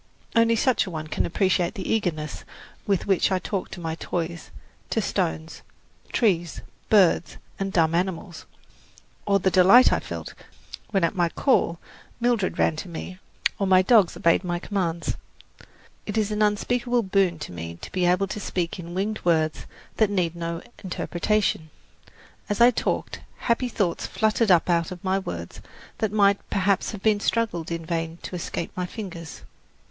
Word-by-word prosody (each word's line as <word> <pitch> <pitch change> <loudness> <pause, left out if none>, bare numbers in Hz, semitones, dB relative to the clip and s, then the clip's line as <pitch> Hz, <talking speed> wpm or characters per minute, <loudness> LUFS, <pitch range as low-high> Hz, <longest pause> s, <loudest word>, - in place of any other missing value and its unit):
Only 230 0 +4
such 230 -2 +2
a - - -4
one 155 -3 -5
can 155 - -1
appreciate 185 +1 +1
the 195 - -5
eagerness 155 -9 -2 0.4
with 200 -3 +1
which 195 0 +2
I 190 - +3
talked 190 +1 -4
to - - -7
my 165 -2 -3
toys, 170 0 -4 0.4
to - - 0
stones, 80 0 -2 0.5
trees, 175 -7 +1 0.3
birds 190 -5 +4 0.2
and 195 0 -2
dumb 165 -3 +2
animals, 175 -1 -2 0.8
or 200 -1 +4
the 190 0 +1
delight 195 +8 +7
I - - +2
felt - - -7 0.6
when 195 -4 +1
at 170 - +2
my 175 -3 +1
call 170 - +2 0.4
Mildred 235 -5 +1
ran 160 - +2
to 180 - -6
me 180 +2 -7 0.4
or 195 - +1
my 185 0 +5
dogs 210 -4 +4
obeyed 170 +3 +3
my 175 -1 -1
commands. 175 -3 -2 0.9
It 210 - -3
is 215 -1 +1
an 210 0 -1
unspeakable 240 +3 +1
boon 190 -3 +2
to 150 - -7
me 85 -1 -7
to - - -9
be 180 -1 +1
able 180 +2 +3
to - - -4
speak 180 -3 -3
in 170 0 -7
winged 210 +3 -1
words 160 -3 +1 0.3
that 220 -2 +3
need 180 -4 0
no 170 0 -4 0.2
interpretation. 185 -2 -1 0.8
As 205 - -1
I 240 +1 +7
talked, - - -2 0.2
happy 245 +1 0
thoughts 200 -7 -1
fluttered 220 0 +1
up 175 -3 +5
out 170 -2 +1
of 180 -1 -8
my 190 0 +1
words 85 - -7 0.4
that 220 -2 0
might 200 -1 +4
perhaps 195 0 +1
have 210 0 +1
struggled 205 -9 -1
in 165 -1 -3
vain 165 0 -3
to - - -6
escape 170 -1 -4
my 180 -1 -2
fingers. 180 -6 -8
185 Hz, 165 wpm, -25 LUFS, 170-205 Hz, 0.9 s, delight